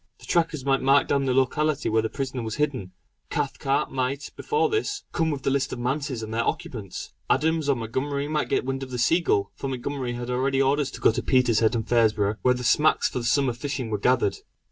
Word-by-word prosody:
The - - -14
trackers 165 -5 0
might 135 -1 +2
mark 135 +2 +4
down 140 -1 +1
the 130 - +1
locality 150 +3 +1
where 110 0 +2
the 110 - -2
prisoner 130 0 -4
was 110 -1 -4
hidden. 135 -11 -2 0.4
Cathcart 135 0 -1
might, 135 +2 -2
before 445 0 +1
this, 425 -1 -2
come 160 -1 0
with 140 -3 -3
the - - +1
list 140 -1 0
of - - -4
manses 130 0 -2
and 110 0 -6
their 115 +1 +1
occupants. 130 - -4 0.2
Adams 160 -1 +1
or 140 - +4
Montgomery 135 +5 -2
might 150 0 -1
get - - +1
wind 135 0 -2
of 135 - -6
the 125 - -4
Seagull; 120 - +2
for 135 - -5
Montgomery 130 -1 -3
had 120 +1 -5
already 135 +2 +1
orders 140 +1 +2
to - - -10
go - - +5
to - - -2
Petershead 120 -3 +3
and 115 - -2
Fraserburgh, 110 -3 +2
where 125 0 +3
the 125 - -5
smacks 150 +6 +3
for - - -3
the 120 - -5
summer 130 +1 +2
fishing 130 -1 -4
were 105 - -1
gathered. 125 -2 +2
130 Hz, 220 wpm, -25 LUFS, 120-145 Hz, 0.4 s, go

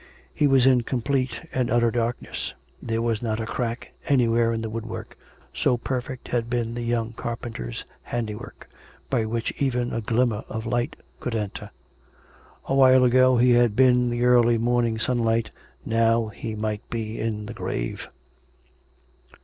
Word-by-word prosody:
He 150 - +3
was 135 -2 +5
in 130 -2 +5
complete 130 +4 -2
and 125 -2 0
utter 120 0 +3
darkness. 120 0 -3 0.3
There 115 0 -1
was 115 -2 0
not 110 -2 -1
a 110 - -2
crack 115 +1 -3 0.2
anywhere 120 -4 +3
in 115 0 -2
the 110 - -3
woodwork 115 0 -6 0.4
(so 125 - +2
perfect 125 +1 -4
had 120 -1 -1
been 120 -1 -1
the 120 - -4
young 115 -1 -1
carpenter's 115 - -5 0.2
handiwork) 110 -3 -5 0.4
by 120 -4 +2
which 115 +1 -2
even 125 -3 0
a 115 - -1
glimmer 115 -1 +1
of 110 +1 -4
light 120 +1 -1 0.2
could 125 - -3
enter. 105 -3 -4 1.0
A - - -2
while 130 -1 +6
ago 130 0 +5
he 125 +1 +5
had 120 -3 +4
been 130 +1 +6
in 125 0 +2
the 120 +1 0
early 120 -1 +5
morning 120 -1 +1
sunlight; 115 -1 0 0.3
now 115 0 +2
he 110 +1 -6
might 105 -1 -2
be 110 -1 -4
in 105 -2 -2
the 115 - -7
grave. - - -4
120 Hz, 155 wpm, -25 LUFS, 115-125 Hz, 1.0 s, while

